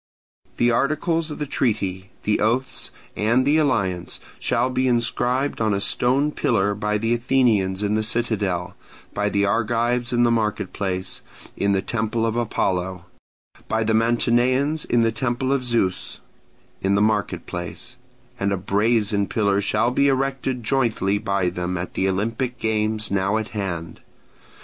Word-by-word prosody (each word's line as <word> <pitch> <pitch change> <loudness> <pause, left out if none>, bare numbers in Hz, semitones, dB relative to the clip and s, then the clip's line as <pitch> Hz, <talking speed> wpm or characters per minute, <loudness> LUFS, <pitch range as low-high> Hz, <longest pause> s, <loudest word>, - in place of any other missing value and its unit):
The 120 0 +3
articles 155 +6 +1
of 150 - -6
the 150 - -2
treaty, 95 -8 -1
the 105 - +1
oaths, 115 +1 0 0.3
and 115 +5 +2
the 145 +3 +4
alliance 100 - 0 0.2
shall 125 +1 +1
be 130 +1 +1
inscribed 125 +2 0
on 110 -2 +2
a - - 0
stone 130 +8 +1
pillar 105 -7 +1
by 105 +1 -1
the 115 +2 0
Athenians 115 -6 +2
in 105 0 0
the 110 - +2
citadel, 105 -6 -1 0.4
by 105 0 0
the 100 -1 +1
Argives 120 +3 +1
in 120 0 +3
the 120 - +4
market 105 -4 -1
place, 95 -2 -3 0.3
in 100 0 +1
the 95 -1 0
temple 115 0 -1
of 115 0 -1
Apollo: 95 -6 -1 0.6
by 110 0 0
the 110 0 +1
Mantineans 120 +6 +2
in 120 - +2
the 115 0 +3
temple 120 +3 -1
of 135 -2 0
Zeus, 115 -7 -1 0.6
in 95 +1 +2
the - - +3
market 105 -1 0
place: 105 +8 -7 0.4
and 100 +1 0
a 100 - +1
brazen 100 +1 +1
pillar 100 0 +1
shall 120 +4 +1
be 140 +2 +3
erected 135 -2 -1
jointly 110 -6 +1
by 100 -4 0
them 90 +1 -3
at 90 +1 -5
the 95 - +1
Olympic 115 +6 -2
games 110 -1 0
now 100 +2 +1
at 110 0 -3
hand. 90 -6 -4
110 Hz, 155 wpm, -23 LUFS, 100-120 Hz, 0.6 s, the